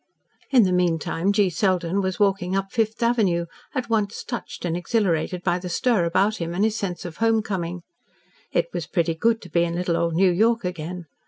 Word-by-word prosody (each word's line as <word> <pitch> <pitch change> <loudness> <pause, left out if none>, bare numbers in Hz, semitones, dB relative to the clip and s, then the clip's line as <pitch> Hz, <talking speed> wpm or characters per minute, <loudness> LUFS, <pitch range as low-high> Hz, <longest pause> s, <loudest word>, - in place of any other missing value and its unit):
In 255 -4 +6
the 185 - +2
meantime 175 +1 +1
G. 200 -2 +2
Selden 185 +1 +1
was 190 -1 -2
walking 195 -2 +1
up 195 0 -2
Fifth 225 -1 0
Avenue, 205 -8 +2 0.3
at 255 -2 -1
once 215 -2 -1
touched 240 -6 -6
and 170 -1 -1
exhilarated 180 -2 0
by 175 0 +1
the 180 0 -6
stir 205 0 +2
about 195 +5 +2
him 170 0 -4
and 195 - +1
his 220 0 +1
sense 185 -6 -4
of 175 - -7
home 225 -1 +2
coming. 180 -4 -4 0.7
It - - +2
was - - -3
pretty 170 -3 0
good 225 +7 +1
to - - -11
be 170 - +3
in 170 0 -2
little 175 -1 0
old 170 -1 0
New 185 +1 +4
York 225 +4 +2
again. 175 0 -5
185 Hz, 200 wpm, -24 LUFS, 170-215 Hz, 0.7 s, In